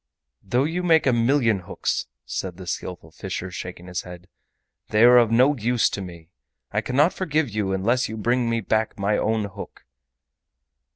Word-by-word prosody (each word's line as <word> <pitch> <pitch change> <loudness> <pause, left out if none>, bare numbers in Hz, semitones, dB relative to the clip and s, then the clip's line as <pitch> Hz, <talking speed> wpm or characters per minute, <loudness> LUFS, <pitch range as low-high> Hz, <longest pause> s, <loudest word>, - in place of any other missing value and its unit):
"Though 120 +7 0
you 165 +5 -1
make 165 -3 +3
a 130 - +3
million 115 -2 +2
hooks," 90 - -3 0.2
said 90 -2 -4
the 95 - -9
Skillful 90 -2 -6
Fisher, 95 +1 -5
shaking 90 0 -7
his 90 0 -4
head, 90 0 -11 0.6
"they 110 +1 +3
are 125 +1 +8
of 115 -2 +3
no 130 +6 +4
use 120 -1 +1
to 100 - -4
me. 85 -3 -10 0.4
I 105 - 0
cannot 145 +9 +2
forgive 160 -7 0
you 100 -2 -1
unless 110 +7 +1
you 110 - -5
bring 120 +2 +1
me 115 0 0
back 110 +2 -1
my 100 +1 +1
own 110 0 0
hook." 100 - -10
110 Hz, 175 wpm, -23 LUFS, 95-125 Hz, 0.6 s, are